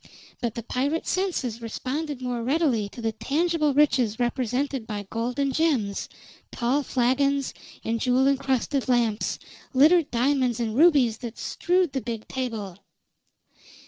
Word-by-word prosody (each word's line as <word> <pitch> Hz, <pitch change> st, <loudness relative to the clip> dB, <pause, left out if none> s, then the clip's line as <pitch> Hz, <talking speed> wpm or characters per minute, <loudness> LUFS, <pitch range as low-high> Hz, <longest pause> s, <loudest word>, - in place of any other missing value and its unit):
But 235 Hz, -3 st, -2 dB
the 235 Hz, -, -5 dB
pirate's 280 Hz, +8 st, -1 dB
senses 315 Hz, -, -1 dB
responded 260 Hz, +4 st, -4 dB
more 245 Hz, -1 st, -2 dB
readily 255 Hz, -6 st, +1 dB
to 235 Hz, -, -10 dB
the 225 Hz, -, +1 dB
tangible 305 Hz, +6 st, 0 dB
riches 255 Hz, -7 st, +3 dB
represented 250 Hz, +1 st, -1 dB
by 205 Hz, -1 st, -4 dB
gold 235 Hz, +2 st, -2 dB
and 275 Hz, -1 st, +1 dB
gems, 255 Hz, -12 st, 0 dB, 0.4 s
tall 255 Hz, +4 st, +1 dB
flagons, 275 Hz, +2 st, +1 dB, 0.3 s
and 230 Hz, 0 st, -1 dB
jewel 255 Hz, +2 st, +2 dB
incrusted 270 Hz, 0 st, 0 dB
lamps, 235 Hz, -4 st, +1 dB, 0.4 s
littered 310 Hz, +3 st, +5 dB
diamonds 250 Hz, -1 st, +1 dB
and 225 Hz, -2 st, -2 dB
rubies 275 Hz, -7 st, +4 dB
that 235 Hz, -2 st, -7 dB
strewed 360 Hz, -3 st, 0 dB
the 265 Hz, -, -1 dB
big 230 Hz, -1 st, -5 dB
table. 220 Hz, -8 st, -4 dB
255 Hz, 135 wpm, -25 LUFS, 230-285 Hz, 0.4 s, littered